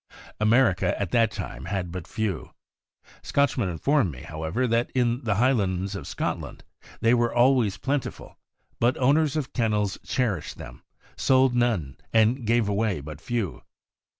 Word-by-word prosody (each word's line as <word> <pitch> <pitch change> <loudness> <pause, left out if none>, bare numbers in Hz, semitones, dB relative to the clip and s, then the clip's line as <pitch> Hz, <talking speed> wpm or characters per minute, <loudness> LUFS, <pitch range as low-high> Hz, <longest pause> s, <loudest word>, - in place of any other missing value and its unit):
America 110 -3 +3
at 95 -4 -2
that 115 -2 +4
time - - -7
had 95 -4 -3
but 90 -2 -6
few. 105 -7 -3 0.7
Scotch 140 -1 +1
men 110 -8 0
inform 120 - +1
me, 65 -5 -9
however, 80 +11 -2
that 115 0 +1
in 120 +1 +1
the 105 -3 +1
Highlands 100 -5 +1
of 95 - -6
Scot - - -2
land - - -10 0.4
they 115 +1 +4
were 120 -1 +2
always 120 -4 +3
plentiful, 140 -1 -4 0.4
but 120 +2 +2
owners 145 +3 +3
of 140 -4 -3
kennels 105 -4 0
cherished 110 - -2
them, - - -10 0.4
sold 130 -1 +3
none, 110 - 0
and 115 +2 +2
gave 115 -2 +3
away 105 -3 0
but 75 +2 -9
few. 115 -3 -3
115 Hz, 150 wpm, -25 LUFS, 95-125 Hz, 0.7 s, that